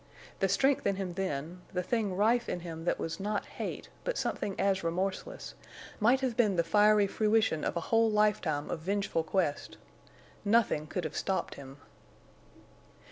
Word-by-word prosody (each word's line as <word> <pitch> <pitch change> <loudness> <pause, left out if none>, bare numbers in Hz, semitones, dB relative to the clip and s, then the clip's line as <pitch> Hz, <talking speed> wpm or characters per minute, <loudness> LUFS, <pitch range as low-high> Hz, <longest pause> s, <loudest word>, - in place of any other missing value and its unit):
The 195 - +2
strength 270 +8 +2
in 200 - +1
him 190 -2 -4
then—the 180 +1 -4
thing 210 -1 -1
rife 235 +4 +2
in 175 - -3
him 165 -1 -7
that - - +1
was 165 0 -4
not 205 +1 -2
hate, - - -6
but - - -2
something 195 - -2
as 195 -2 +1
remorseless—might 195 +6 -2
have 255 -3 -1
been 215 -5 +3
the 170 - +2
fiery 210 +4 +5
fruition 215 -5 +1
of - - -1
a - - -1
whole 225 0 +5
lifetime 205 -9 +1
of - - -2
vengeful 195 0 -1
quest. 160 -2 -1 0.7
Nothing 205 -8 +2
could 180 +3 -3
have 155 - -5
stopped 190 - -1
him. 135 0 -11
195 Hz, 155 wpm, -31 LUFS, 170-215 Hz, 0.7 s, fiery